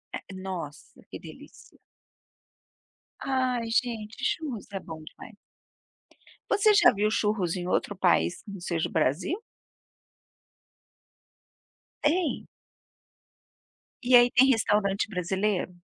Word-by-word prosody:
É 195 Hz, -, -9 dB
Nossa, 185 Hz, -6 st, -8 dB
que -, -, -8 dB
delícia. -, -, -14 dB, 1.4 s
Ai 255 Hz, -3 st, -1 dB
gente, 225 Hz, -2 st, -1 dB
churros 270 Hz, -10 st, -3 dB
é 195 Hz, -, -4 dB
bom 160 Hz, -3 st, -9 dB
demais. 210 Hz, +7 st, -13 dB, 1.1 s
Você 420 Hz, +1 st, +4 dB
já 410 Hz, -, +6 dB
viu 210 Hz, +1 st, +1 dB
churros 205 Hz, -6 st, 0 dB
em 175 Hz, 0 st, -4 dB
outro 205 Hz, -, 0 dB
país, 170 Hz, -, +1 dB
que 200 Hz, -, -10 dB
não 195 Hz, -, -8 dB
seja 170 Hz, -2 st, -1 dB
o -, -, -15 dB
Brasil? 160 Hz, -, 0 dB, 2.7 s
Tem? 325 Hz, +3 st, 0 dB, 1.6 s
E 245 Hz, 0 st, +5 dB
aí 240 Hz, 0 st, +7 dB
tem 265 Hz, +2 st, +5 dB
restaurante 210 Hz, -4 st, +1 dB
brasileiro? 190 Hz, 0 st, -1 dB
210 Hz, 105 wpm, -27 LUFS, 180-245 Hz, 2.7 s, aí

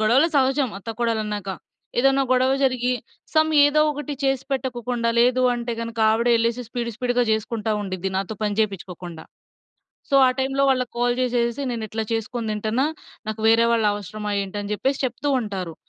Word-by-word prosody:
గొడవలు 250 Hz, +9 st, +4 dB
సహజం 270 Hz, 0 st, +2 dB
అత్తా‌కోడళ్ళన్నాక. 215 Hz, -2 st, -2 dB, 0.5 s
ఏదన్నా 270 Hz, +2 st, +4 dB
గొడవ 255 Hz, +1 st, +3 dB
జరిగి 255 Hz, -1 st, +1 dB, 0.4 s
సమ్ 315 Hz, 0 st, +4 dB
ఏదో 290 Hz, +1 st, +4 dB
ఒకటి 295 Hz, 0 st, -5 dB
చేసిపెట్టకోకుండా, 250 Hz, -3 st, -1 dB
లేదు 250 Hz, +1 st, +3 dB
అంటే 240 Hz, 0 st, -3 dB
గనుక 230 Hz, 0 st, -6 dB
ఆవిడె 235 Hz, +2 st, +2 dB
ఎళ్ళేసెసి 235 Hz, +1 st, -1 dB
స్పీడు 235 Hz, -1 st, -3 dB
స్పీడు‌గా 245 Hz, 0 st, +1 dB
జేసుకుంటా 220 Hz, 0 st, -1 dB
ఉండిద్ది 190 Hz, -1 st, -3 dB
నాతో 195 Hz, +3 st, -2 dB
పని 210 Hz, 0 st, -1 dB
చేపించుకోకుండా. 180 Hz, -5 st, -4 dB, 0.9 s
సో, -, -, +1 dB
ఆ -, -, +3 dB
టైమ్‌లో 270 Hz, +1 st, 0 dB
వాళ్ళకి 255 Hz, -2 st, 0 dB
కాల్ 245 Hz, 0 st, +2 dB
జేసేసేసి 240 Hz, +1 st, 0 dB
"నేనిట్ల 220 Hz, -1 st, -3 dB
చేసుకొని 225 Hz, 0 st, -2 dB
తింటన్నా. 220 Hz, +6 st, 0 dB, 0.4 s
నాకు 215 Hz, 0 st, -4 dB
వేరే 230 Hz, +1 st, +5 dB
వాళ్ళు 225 Hz, -2 st, +2 dB
అవసరమా 205 Hz, +1 st, -5 dB
ఏంటి?" 195 Hz, +1 st, -6 dB
అని 205 Hz, +1 st, -6 dB
జెప్పేసి 270 Hz, +6 st, -1 dB
చెప్తూ 255 Hz, +3 st, -2 dB
ఉంటారు. 190 Hz, -6 st, -5 dB
235 Hz, 150 wpm, -23 LUFS, 215-255 Hz, 0.9 s, వేరే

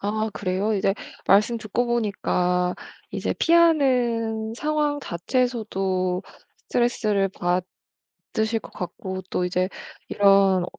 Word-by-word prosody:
아 215 Hz, +2 st, -1 dB
그래요? 195 Hz, +3 st, -1 dB
이제 195 Hz, 0 st, +1 dB, 0.3 s
말씀 215 Hz, +4 st, +4 dB
듣고 220 Hz, +3 st, -1 dB
보니까 180 Hz, -6 st, 0 dB, 0.3 s
이제 -, -, -2 dB
피하는 245 Hz, -10 st, +3 dB
상황 300 Hz, +1 st, 0 dB
자체에서도 190 Hz, -4 st, -1 dB, 0.5 s
스트레스를 215 Hz, -5 st, +1 dB
받으실 190 Hz, +5 st, -3 dB
것 -, -, -13 dB
같고 185 Hz, +1 st, -6 dB
또 180 Hz, -, 0 dB
이제 180 Hz, +1 st, 0 dB, 0.4 s
이런 195 Hz, -2 st, +4 dB
210 Hz, 230 characters per minute, -24 LUFS, 185-240 Hz, 0.5 s, 말씀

